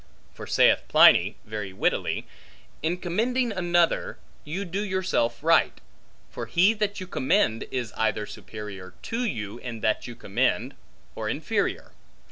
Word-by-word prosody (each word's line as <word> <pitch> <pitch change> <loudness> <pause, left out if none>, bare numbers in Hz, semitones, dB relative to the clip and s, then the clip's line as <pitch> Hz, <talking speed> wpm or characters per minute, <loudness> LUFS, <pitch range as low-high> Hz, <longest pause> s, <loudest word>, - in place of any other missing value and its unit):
For - - -9
saith - - +4
Pliny, - - +6
very 105 -2 -5
wittily, - - 0 0.6
In 165 +4 0
commending 230 +8 0
another, 175 -3 +1 0.3
you 180 +7 -4
do 190 +3 -3
yourself 185 - -1
right; 165 +1 +3 0.5
for - - -6
he 190 +6 +4
that 210 -2 -2
you 185 - -5
commend, 170 - +1
is 120 -4 -3
either 110 -1 0
superior 95 -3 -9
to 235 +2 -2
you 110 - -3
in 115 -3 -7
that 110 - 0
you 120 - -8
commend, 100 -4 0 0.4
or - - -4
inferior. - - -1
165 Hz, 135 wpm, -26 LUFS, -, 0.6 s, Pliny